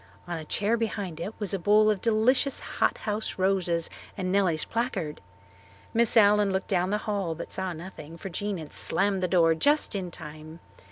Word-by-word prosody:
On 175 Hz, -, -3 dB
a -, -, -7 dB
chair 210 Hz, +8 st, 0 dB
behind 200 Hz, -7 st, -3 dB
it 200 Hz, +6 st, -5 dB
was 205 Hz, -2 st, -3 dB
a 195 Hz, -, 0 dB
bowl 210 Hz, +3 st, +5 dB
of 205 Hz, -, -2 dB
delicious 235 Hz, +5 st, +2 dB
hot -, -, 0 dB
house 215 Hz, 0 st, -3 dB
roses 185 Hz, -3 st, +1 dB, 0.3 s
and 185 Hz, -2 st, -2 dB
Nellie's 185 Hz, -5 st, +2 dB
placard. 200 Hz, -10 st, -2 dB, 0.7 s
Miss 235 Hz, 0 st, +3 dB
Allen 205 Hz, -1 st, +6 dB
looked 190 Hz, 0 st, -2 dB
down 185 Hz, -1 st, +1 dB
the 210 Hz, -, +1 dB
hall 200 Hz, -6 st, -2 dB
but 170 Hz, -, -7 dB
saw 190 Hz, -1 st, -2 dB
nothing, 165 Hz, -1 st, -9 dB
for 195 Hz, -, -6 dB
Jean 205 Hz, +2 st, -3 dB
had 155 Hz, -3 st, -9 dB
slammed 195 Hz, -1 st, 0 dB
the 180 Hz, -, +1 dB
door 170 Hz, -2 st, +4 dB
just 290 Hz, -, +2 dB
in 190 Hz, -3 st, -3 dB
time. 155 Hz, 0 st, -10 dB
195 Hz, 185 wpm, -27 LUFS, 170-210 Hz, 0.7 s, Allen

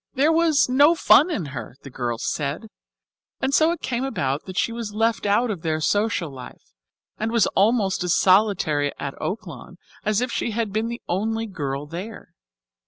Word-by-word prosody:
There 285 Hz, +4 st, +3 dB
was 325 Hz, -2 st, +3 dB
"no 285 Hz, +6 st, +5 dB
fun 325 Hz, 0 st, +5 dB
in 215 Hz, -, -2 dB
her," 120 Hz, -1 st, -7 dB
the 140 Hz, -, -10 dB
girls 120 Hz, -2 st, -3 dB
said, 150 Hz, +9 st, -3 dB, 0.7 s
and 265 Hz, +1 st, -1 dB
so 315 Hz, +3 st, +4 dB
it 340 Hz, -, -4 dB
came 245 Hz, 0 st, -2 dB
about 140 Hz, -, -2 dB
that 185 Hz, -1 st, -8 dB
she 250 Hz, -2 st, +1 dB
was 230 Hz, -3 st, -6 dB
left 225 Hz, -1 st, 0 dB
out 220 Hz, +4 st, +2 dB
of 185 Hz, -6 st, -5 dB
their 155 Hz, -1 st, -1 dB
social 205 Hz, -2 st, 0 dB
life, 125 Hz, -, -12 dB, 0.5 s
and 220 Hz, +1 st, -1 dB
was 230 Hz, -3 st, +3 dB
almost 200 Hz, -3 st, +2 dB
as 180 Hz, -2 st, +2 dB
solitary 185 Hz, -7 st, +3 dB
at 140 Hz, -, -5 dB
Oaklawn 185 Hz, -, -6 dB, 0.3 s
as 215 Hz, 0 st, +1 dB
if 250 Hz, 0 st, -2 dB
she -, -, -1 dB
had 220 Hz, -2 st, -2 dB
been 220 Hz, +2 st, 0 dB
the 235 Hz, +1 st, -6 dB
only 225 Hz, +5 st, -1 dB
girl 145 Hz, -8 st, -4 dB
there. 180 Hz, +8 st, -8 dB
210 Hz, 180 wpm, -23 LUFS, 155-235 Hz, 0.7 s, no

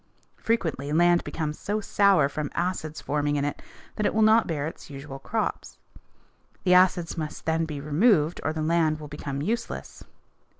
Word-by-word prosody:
Frequently 160 Hz, -, -1 dB
land 175 Hz, +2 st, +4 dB
becomes 155 Hz, -2 st, -4 dB
so 210 Hz, +2 st, -2 dB
sour 200 Hz, -7 st, +3 dB
from 145 Hz, 0 st, -4 dB
acids 170 Hz, -3 st, -2 dB
forming 145 Hz, 0 st, -1 dB
in 145 Hz, 0 st, 0 dB
it 145 Hz, -, -4 dB, 0.4 s
that 210 Hz, -, 0 dB
it -, -, -2 dB
will 220 Hz, -, +4 dB
not 220 Hz, +1 st, +5 dB
bear 150 Hz, -4 st, -2 dB
its 160 Hz, -, -8 dB
usual 135 Hz, -1 st, -8 dB
crops. 220 Hz, +10 st, -3 dB, 0.9 s
The 180 Hz, -, +4 dB
acids 180 Hz, -2 st, +3 dB
must 155 Hz, -1 st, -6 dB
then 160 Hz, 0 st, +1 dB
be 150 Hz, -3 st, -5 dB
removed 155 Hz, -, +2 dB
or 155 Hz, -, 0 dB
the 155 Hz, 0 st, -3 dB
land 160 Hz, -1 st, +2 dB
will 150 Hz, -, -8 dB
become 145 Hz, -1 st, -5 dB
useless. 230 Hz, +8 st, -4 dB
160 Hz, 170 wpm, -26 LUFS, 150-185 Hz, 0.9 s, not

